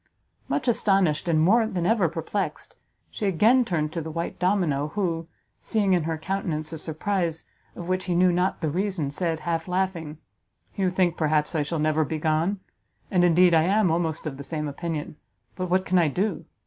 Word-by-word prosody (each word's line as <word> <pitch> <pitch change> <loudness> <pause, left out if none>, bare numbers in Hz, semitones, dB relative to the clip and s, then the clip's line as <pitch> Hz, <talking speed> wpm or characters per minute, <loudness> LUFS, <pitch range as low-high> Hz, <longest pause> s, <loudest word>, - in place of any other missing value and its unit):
Much - - -2
astonished, 195 -8 +2
and 160 -2 +3
more 220 +8 +4
than 180 -6 -2
ever 200 -4 +3
perplexed, 170 +5 -4 0.4
she 210 - -2
again 220 +8 +4
turned 155 -7 -2
to 165 - -2
the 160 - -6
white 165 +2 -4
domino, 175 -6 +1
who, 165 -5 -1 0.3
seeing 205 -4 +1
in 175 -4 +1
her 165 -1 -2
countenance 160 -3 -3
a 160 - -3
surprise 165 +1 -1 0.3
of 175 - -7
which 185 0 -1
he 180 - -1
knew 180 +1 +4
not 180 +1 0
the 160 - 0
reason, 180 -4 -1
said, 165 +1 -2
half 165 0 -2
laughing, 180 -4 -2 0.6
"You 190 -2 +1
think, 180 -2 +1
perhaps, 155 -1 +1
I 160 - +1
shall 150 +3 -2
never 155 +1 +2
be 155 +2 -3
gone? 160 +5 0 0.5
And 180 -2 +3
indeed 175 0 +5
I 160 - +6
am 195 -1 +3
almost 165 -1 -1
of 140 -3 -4
the 140 - -7
same 150 0 -4
opinion; 150 0 -5 0.4
but 185 -1 -3
what 185 +1 +2
can 185 0 +3
I 165 - +3
do? 190 +9 -2
170 Hz, 190 wpm, -25 LUFS, 155-190 Hz, 0.6 s, I